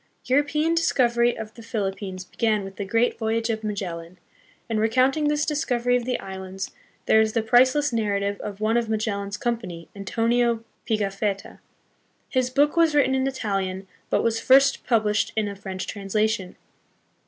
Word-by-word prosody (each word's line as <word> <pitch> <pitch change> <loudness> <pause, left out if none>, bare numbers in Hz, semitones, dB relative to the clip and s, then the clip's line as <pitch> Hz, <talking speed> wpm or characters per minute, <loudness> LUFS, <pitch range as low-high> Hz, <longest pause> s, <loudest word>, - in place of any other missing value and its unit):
European 295 +4 +2
discovery 240 -7 +2
of 220 0 -7
the 230 - -12
Philippines 195 -4 -4
began 215 0 0
with 195 0 -9
the 200 - -3
great 230 +5 +1
voyage 225 +1 0
of 220 0 -4
Magellan; 180 -4 -5 0.5
and 225 -2 -1
recounting 255 +7 +2
this 295 0 +1
discovery 245 -5 +1
of 245 -1 0
the 250 0 -1
islands, 190 0 -6 0.3
there 220 - +5
is 220 0 +1
the 230 - +1
priceless 255 +5 +4
narrative 200 -2 0
of 205 -1 -6
one 220 +2 +2
of 235 -2 -1
Magellan's 205 -2 -2
company, 215 -10 -4
Antonio 230 +3 +1 0.3
Pigafetta. 200 -1 -2 0.7
His 255 -2 +1
book 285 +4 +2
was 330 -3 +3
written 275 -2 +4
hi 265 0 +1
Italian, 195 -6 -3 0.2
but - - +1
was 225 -1 +1
first 270 +3 +4
published 215 -3 +1
hi 220 - +3
a 200 -1 -4
French 190 -1 -6
translation. 205 -1 -1
220 Hz, 155 wpm, -24 LUFS, 200-245 Hz, 0.7 s, there